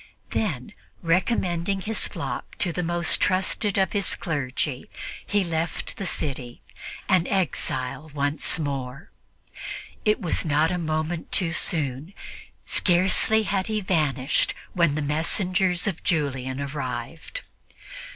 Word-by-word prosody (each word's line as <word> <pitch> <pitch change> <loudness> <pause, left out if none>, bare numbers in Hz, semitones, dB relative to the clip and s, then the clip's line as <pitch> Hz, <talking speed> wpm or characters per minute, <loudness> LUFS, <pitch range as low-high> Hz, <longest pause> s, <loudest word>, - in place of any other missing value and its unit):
Then, 160 - -2 0.3
recommending 180 +1 +1
his 220 +3 +1
flock - - -5
to 175 -4 +1
the 180 - -1
most 175 0 +1
trusted 190 +2 +2
of 190 -1 +2
his 200 -2 +1
clergy, 140 -4 -2 0.4
he 205 -1 +2
left 165 -1 -3
the 195 - -3
city, 130 -7 -3 0.4
an 185 -3 +3
exile 145 -6 -1
once 145 +2 +1
more. 140 0 -4 0.9
It 210 0 +3
was 175 - +2
not 155 +1 +2
a 180 - -1
moment 155 +1 -2
too 170 -4 +3
soon. 155 - -1 0.5
Scarcely 190 +4 +4
had 195 -2 -1
he 215 -1 0
vanished 155 -8 +1 0.2
when 170 -5 +3
the 155 - -1
messengers 180 +5 +2
of 195 -5 -2
Julian 135 -5 0
arrived. 140 - -4
165 Hz, 120 wpm, -25 LUFS, 145-185 Hz, 0.9 s, Scarcely